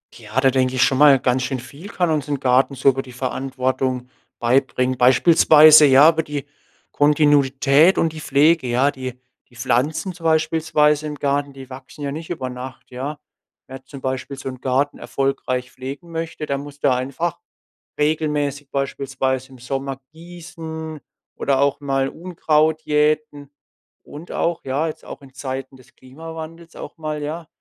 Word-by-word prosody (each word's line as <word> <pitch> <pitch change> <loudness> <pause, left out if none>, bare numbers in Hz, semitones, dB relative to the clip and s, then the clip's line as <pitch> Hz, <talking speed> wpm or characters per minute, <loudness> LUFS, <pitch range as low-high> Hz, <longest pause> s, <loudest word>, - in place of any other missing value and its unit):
Ja, 120 +5 -3
da 135 - +5
denke 130 0 +1
ich 130 - +1
schon 130 - +2
mal: 140 -2 +7
Ganz 125 0 0
schön 130 -1 -3
viel 140 +9 -11
kann 180 -4 -1
uns 150 -3 -1
'n 145 -2 -2
Garten 130 +1 +2
so 135 +1 +4
über 135 0 -1
die 125 - -13
Verantwortung 130 0 -2 0.3
beibringen. 130 +1 +1
Beispielsweise, 155 +3 +7
ja, 140 +3 +7
über 160 0 0
die 145 -2 -5 0.5
Kontinuität 145 +2 +4
und 165 - +1
die 155 - -8
Pflege, 150 +1 +3
ja. 125 +4 +2
Die 130 -2 -7 0.3
die 120 - -22
Pflanzen 155 +10 -1
zum 170 -1 -12
beispielsweise 155 -1 +2
im 150 - -5
Garten, 140 0 -1
die 135 -1 -12
wachsen 130 +3 -10
ja 140 - -2
nicht 160 +3 -7
über 145 -7 -4
Nacht, 125 +1 -9
ja. 140 +4 -5 0.5
Wer 130 0 -10
zum 135 -2 -11
Beispiel 130 +1 -4
so 135 - -6
'n 130 -1 -10
Garten 135 +2 0
erfolgreich 130 -2 -2
pflegen 140 +6 -8
möchte, 165 -1 -5
der 140 - -1
muss 145 +1 -10
da 135 -3 +2
einfach 140 +7 -3 0.6
regelmäßig, 150 -2 -1
beispielsweise 135 -1 -2
im 130 - -13
Sommer, 135 +2 -4
gießen 160 -2 -8 0.4
oder 135 -1 0
auch 140 -1 +1
mal 135 -1 -1
Unkraut 160 -2 0
jäten 150 -1 0 0.5
und 155 +4 -11
auch, 170 0 -1
ja, 140 +4 -1
jetzt 155 0 -7
auch - - -9
in 135 -1 -16
Zeiten 130 0 -6
des 130 - -21
Klimawandels 160 +4 -10
auch - - -9
mal, 155 -1 -4
ja, 155 +2 -5
140 Hz, 165 wpm, -21 LUFS, 130-155 Hz, 0.6 s, mal